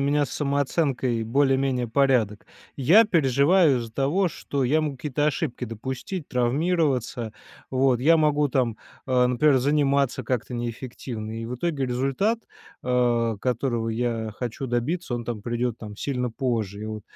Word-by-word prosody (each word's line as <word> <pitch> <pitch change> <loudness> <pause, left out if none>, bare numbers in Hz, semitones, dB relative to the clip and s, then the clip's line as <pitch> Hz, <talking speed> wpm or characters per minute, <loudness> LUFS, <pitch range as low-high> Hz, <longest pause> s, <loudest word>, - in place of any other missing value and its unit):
меня 145 +1 +2
с - - -11
самооценкой 140 -4 0
более-менее 135 0 +1
порядок. 120 -5 +2 0.3
Я 170 - +6
переживаю 150 - +3
из-за 115 -1 -6
того, 145 - +1
что 140 -3 -3
я 155 +5 +2
мог 145 -3 -3
какие-то 145 +2 -2
ошибки 145 -4 -2
допустить, 130 - -5
травмироваться. 130 -3 0 0.4
Вот 130 -2 +2
я 160 +5 +5
могу 150 -1 +2
там, 125 -5 0 0.3
а, 125 -1 +3
например, 130 +3 +3
заниматься 140 0 +2
как-то 125 -1 -2
неэффективно, 120 -2 -5
и 115 - -5
в 125 - -4
итоге 140 -2 -1
результат, 135 - 0 0.4
а, 120 -3 +1
которого 120 -1 -1
я 115 -1 -2
хочу 125 +2 -4
добиться, 125 +5 -1
он 120 -1 -4
там 115 -2 -4
придет, 120 +1 -2
там, 105 -2 -9
сильно 125 -1 -2
позже. 110 -5 -2
И - - -4
вот. 110 -1 -6
130 Hz, 145 wpm, -25 LUFS, 120-145 Hz, 0.4 s, Я